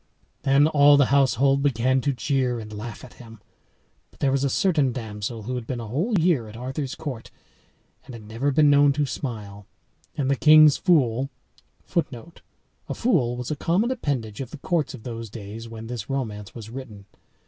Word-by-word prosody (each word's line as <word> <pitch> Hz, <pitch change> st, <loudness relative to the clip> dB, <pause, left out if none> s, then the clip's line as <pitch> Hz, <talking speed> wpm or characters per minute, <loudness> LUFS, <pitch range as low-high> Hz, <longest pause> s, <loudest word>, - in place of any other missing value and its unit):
Then 140 Hz, +1 st, +4 dB
all 145 Hz, -2 st, +6 dB
the 140 Hz, -, +5 dB
household 135 Hz, 0 st, +3 dB
began 130 Hz, -1 st, +1 dB
to 140 Hz, -, 0 dB
jeer 130 Hz, -2 st, -1 dB
and 110 Hz, -1 st, -9 dB
laugh 105 Hz, +2 st, -7 dB
at 125 Hz, -, -15 dB
him. 115 Hz, -2 st, -13 dB, 0.7 s
But -, -, -25 dB
there 140 Hz, -, +2 dB
was 135 Hz, 0 st, +1 dB
a 140 Hz, -, +2 dB
certain 150 Hz, -4 st, +2 dB
damsel 110 Hz, -1 st, -5 dB
who 125 Hz, +5 st, -4 dB
had 125 Hz, -2 st, -5 dB
been 125 Hz, -, -3 dB
a 115 Hz, -, -6 dB
whole 170 Hz, -, -1 dB
year 160 Hz, -9 st, +2 dB
at 105 Hz, +1 st, -11 dB
Arthur's 130 Hz, +2 st, -4 dB
court, 135 Hz, -7 st, -7 dB, 0.8 s
and 125 Hz, -, -10 dB
had 115 Hz, -, -11 dB
never 115 Hz, +7 st, -2 dB
been 150 Hz, +2 st, +4 dB
known 145 Hz, 0 st, +5 dB
to 145 Hz, +1 st, 0 dB
smile. 105 Hz, -7 st, -6 dB, 0.5 s
And 140 Hz, -3 st, 0 dB
the 140 Hz, -, +2 dB
king's 155 Hz, +1 st, +7 dB
fool 135 Hz, -, +2 dB, 0.5 s
[Footnote: 165 Hz, -1 st, -4 dB, 0.5 s
A -, -, -3 dB
fool 130 Hz, -, +1 dB
was 125 Hz, +2 st, -5 dB
a -, -, 0 dB
common 185 Hz, -, +1 dB
appendage 135 Hz, -, -3 dB
of 130 Hz, -, -6 dB
the -, -, -9 dB
courts 150 Hz, -2 st, -1 dB
of 115 Hz, -, -13 dB
those 115 Hz, -2 st, -6 dB
days 110 Hz, +2 st, -8 dB
when 115 Hz, 0 st, -8 dB
this 115 Hz, 0 st, -6 dB
romance 110 Hz, -7 st, -4 dB
was 110 Hz, -2 st, -9 dB
written. 115 Hz, -6 st, -9 dB
130 Hz, 190 wpm, -24 LUFS, 115-145 Hz, 0.8 s, king's